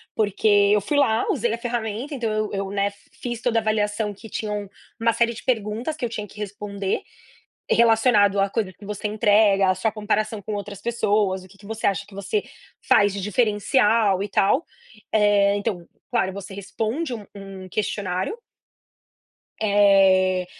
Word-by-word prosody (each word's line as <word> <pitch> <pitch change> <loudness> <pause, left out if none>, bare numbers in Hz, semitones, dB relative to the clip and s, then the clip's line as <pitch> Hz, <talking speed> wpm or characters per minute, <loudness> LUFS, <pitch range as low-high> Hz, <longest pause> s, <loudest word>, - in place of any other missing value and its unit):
porque 210 -1 0 0.3
eu 210 - +3
fui 285 +9 -1
lá, 225 -6 +2
usei 240 -3 0
a - - -2
ferramenta, 235 +3 -3
então, 235 -4 -2
eu 215 0 -1
eu, 195 -1 -2
né, 200 0 0 0.3
fiz 240 -2 -4
toda 235 -2 +1
a - - -3
avaliação 210 -1 0
que 220 +3 -13
tinham 210 -2 -4 0.3
uma 230 0 +2
série 235 +1 +1
de 230 - -10
perguntas 230 +4 -1
que 255 - -2
eu - - -3
tinha 215 -2 -5
que 205 - -17
responder, 200 -1 -3 0.7
relacionado 225 -3 +4
à 195 - +3
coisa 205 -3 -2
que 205 - -14
você 210 +1 -4
entrega, 205 -2 +3
à - - -1
sua 200 +4 0
comparação 215 0 -1
com 210 +2 -5
outras 200 -1 -6
pessoas, 205 -5 0
o - - -14
que 195 +2 -20
que 200 - -17
você 225 +1 -2
acha 195 -4 0
que 205 - -17
você 410 - -2 0.4
faz 205 0 +5
de 200 - -4
diferencial 210 -1 +2
e - - -3
tal. 195 - +2 0.5
Eh, 205 -1 +4
então, 200 -4 -3 0.3
claro 215 -6 +1
você 195 0 -8
responde 225 - -3
um 215 -3 -7
um 195 -1 -9
questionário. 190 - -2 1.2
Eh, 195 -3 +4
210 Hz, 170 wpm, -23 LUFS, 200-225 Hz, 1.2 s, faz